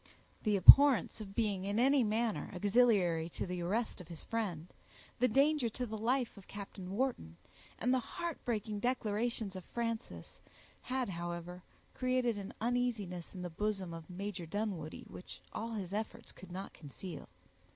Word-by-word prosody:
The 210 -2 +2
abhorrence 260 +3 +9
of 200 -2 -9
being, 205 -5 0
in 200 +2 -1
any 265 +2 +5
manner, 220 0 0
auxiliary 190 -5 +3
to - - -4
the 180 -1 -4
arrest 205 +4 -1
of 175 - -12
his 170 -2 -9
friend; 195 -9 -2 0.5
the 250 - +4
danger 275 +1 +3
to 250 +3 -4
the 220 -2 -5
life 240 +2 0
of 195 - -13
Captain 195 -2 -8
Wharton; 200 - -2 0.4
and 250 +3 +1
the 260 - +3
heart 340 +6 -5
breaking 215 -3 -2
declarations 225 -3 -1
of 185 - -6
Frances, 230 +1 -5 0.4
had, 255 -3 -2
however, 175 0 -5 0.3
created 255 -4 +1
an 195 - -6
uneasiness 225 -8 -1
in 180 - -5
the 175 - -5
bosom 195 -1 -2
of 165 0 -9
Major 185 -1 -5
Dunwoodie, 190 -5 -4
which 180 - -10
all 230 +1 -4
his 195 -4 -4
efforts 225 +2 -4
could 185 -2 -13
not 190 +2 -6
conceal. 160 +3 -9
210 Hz, 160 wpm, -34 LUFS, 180-240 Hz, 0.5 s, abhorrence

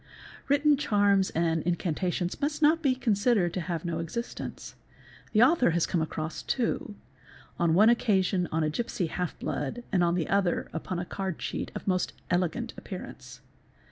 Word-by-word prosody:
Written 285 +1 +4
charms 205 -6 +3
and 165 -1 0
incantations 175 +1 -1
must 295 +1 -1
not 315 +2 +4
be 270 -5 +2
considered 210 -6 +2
to 185 - -2
have 170 0 -4
no 165 -1 -2
existence. 200 +9 -5 0.6
The 215 +1 +5
author 255 - +4
has 170 - +2
come 175 - 0
across 160 0 -4
two; 230 -4 -2 0.6
on 165 -1 +3
one 210 +4 +6
occasion 190 -6 +2
on 160 0 +1
a 155 - +1
gipsy 210 -1 -2
half 180 +1 -3
blood 145 - -3
and 185 -4 +3
on 170 0 +2
the 170 -3 -1
other 195 -3 0
upon 170 +2 -4
a 175 - -3
card 190 -2 -4
cheat - - -4
of - - -6
most 185 -2 0 0.2
elegant 180 -2 0
appear - - -7
ance. - - -11
185 Hz, 170 wpm, -28 LUFS, 170-230 Hz, 0.6 s, one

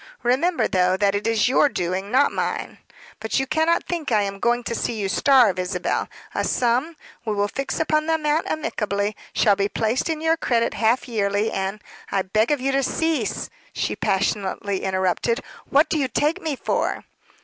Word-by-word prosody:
Remember, 310 +8 +2
though, 185 0 +2
that 200 0 +2
it 205 +2 -1
is 225 -1 +2
your 275 +3 +4
doing, 185 -1 -2
not 270 +5 +3
mine. - - -3 0.4
But 220 +4 -1
you 270 - 0
cannot 320 +4 +1
think 335 -6 -4
I 210 -2 +3
am 195 0 -4
going 240 +2 +1
to 235 - -3
see 230 - -2
you 200 - -1
starve, 230 -3 +4
Isabel. 180 0 -1 0.2
A - - -1
sum 255 +7 +1 0.3
we 215 -3 -2
will 205 0 +1
fix 275 +6 -3
upon 310 -1 +1
the 325 - +3
amount 305 +1 0
amicably 205 -8 -2 0.2
shall 205 -2 +4
be 200 +1 0
placed 225 +4 0
to 320 -2 -2
your 325 +1 +2
credit 235 -6 +1
half 230 +3 +1
yearly, 210 -2 0
and 195 +2 -3
" - - -19
"I 195 - +1
beg 215 +4 +1
of 295 -2 +1
you 270 +2 0
to 275 0 +2
cease," 300 -4 -1 0.2
she - - -2
passionately 195 0 -1
interrupted. 190 +4 0 0.3
"What 295 +3 +4
do 315 - 0
you 270 - +1
take 305 +8 0
me 310 -3 -2
for?" - - -1
230 Hz, 190 wpm, -23 LUFS, 200-290 Hz, 0.4 s, your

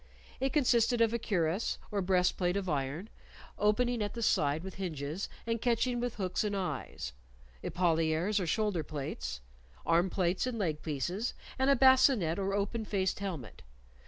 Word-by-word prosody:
It 270 0 0
consisted 240 -4 +3
of 230 -1 +3
a 235 - 0
cuirass, 185 -3 0
or 205 -1 0
breastplate 180 0 +2
of 195 -2 -3
iron, 145 +4 -2 0.5
opening 235 +3 +2
at 205 +1 -2
the 235 - -3
side 150 -5 +2
with 190 -1 -6
hinges, 160 0 -3 0.2
and 230 -1 -1
catching 240 0 +1
with 245 -1 -2
hooks 185 -1 -1
and 205 -1 -1
eyes; 180 - -4 0.5
epauliers, 165 +3 +1
or 180 - -2
shoulder 205 -1 +1
plates; 65 - -5 0.4
arm 170 +3 +3
plates 185 +5 0
and 250 -2 -3
leg 160 -8 -1
pieces; 175 - -2 0.2
and 265 +1 +3
a 280 - +6
bascinet, 260 - +5
or 195 0 0
open 205 +3 -1
faced 195 -3 -1
helmet. 165 - -5
190 Hz, 160 wpm, -32 LUFS, 165-230 Hz, 0.5 s, a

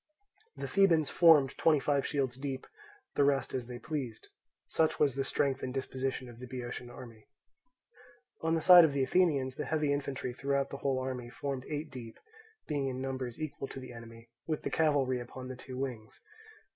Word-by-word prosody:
The - - -4
Thebans 170 -7 +3
formed 155 -6 +6
twenty 155 -3 +4
five 140 0 +1
shields 135 -4 -1
deep, 135 0 -5 0.5
the - - +3
rest 140 -2 +1
as 125 -2 -3
they 125 -1 -6
pleased. 130 -4 -5 0.4
Such 160 -1 +1
was 145 -3 +3
the 135 +1 -1
strength 135 0 0
and 130 - -3
disposition 130 0 -3
of 120 -1 -12
the 125 - -8
Boeotian 125 -1 -6
army. 115 -3 -12 1.1
On 160 0 +1
the 165 - 0
side 180 +1 +10
of 155 -3 +3
the 140 -1 +1
Athenians, 140 -5 +2
the - - -3
heavy 150 -2 +1
infantry 140 -3 -3
throughout 140 +1 -1
the 140 - -5
whole 135 -1 0
army 130 -2 -4
formed 135 +1 -4
eight 150 0 -4
deep, 120 -3 -9 0.5
being 145 -3 -1
in 130 -1 -3
numbers 130 -2 -4
equal 155 -3 -4
to 135 - -8
the 130 -1 -9
enemy, 115 0 -12 0.2
with 155 -2 -2
the - - -3
cavalry 140 -5 +2
upon 125 +1 -8
the 130 - -5
two 130 0 -9
wings. 125 -5 -5
135 Hz, 185 wpm, -32 LUFS, 125-145 Hz, 1.1 s, side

